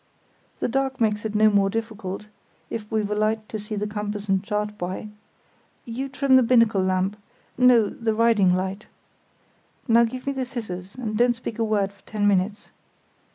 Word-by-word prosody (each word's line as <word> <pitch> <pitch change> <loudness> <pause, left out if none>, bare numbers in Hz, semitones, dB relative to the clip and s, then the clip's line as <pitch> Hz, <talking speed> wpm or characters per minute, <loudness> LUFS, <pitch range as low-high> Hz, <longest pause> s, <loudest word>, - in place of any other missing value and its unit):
"The - - +1
dark 265 +1 -1
makes 210 -2 +1
it 215 -1 -3
no 215 0 +5
more 200 -1 +3
difficult, 215 -3 -4 0.5
if 215 -1 -5
we've 215 -2 0
a - - +2
light 215 +1 0
to 215 - -4
see 210 +1 -5
the 205 0 -2
compass 210 0 -4
and 195 -1 +1
chart 210 0 -2
by. 185 +3 -5 0.8
You 255 +4 -4
trim 270 -1 +4
the - - +6
binnacle 230 -4 +4
lamp—no, 210 +5 +1
the 225 0 -2
riding 215 -5 +4
light. 190 +3 -3 1.0
Now 235 0 +6
give 255 +2 -6
me 280 - -1
the 265 -1 -2
scissors, 195 -7 -7
and 225 -4 -4
don't 240 +2 +3
speak 230 -1 -7
a - - +2
word 205 -3 0
for 200 - -26
ten 210 -1 0
minutes. 200 +1 0
215 Hz, 175 wpm, -24 LUFS, 205-230 Hz, 1.0 s, the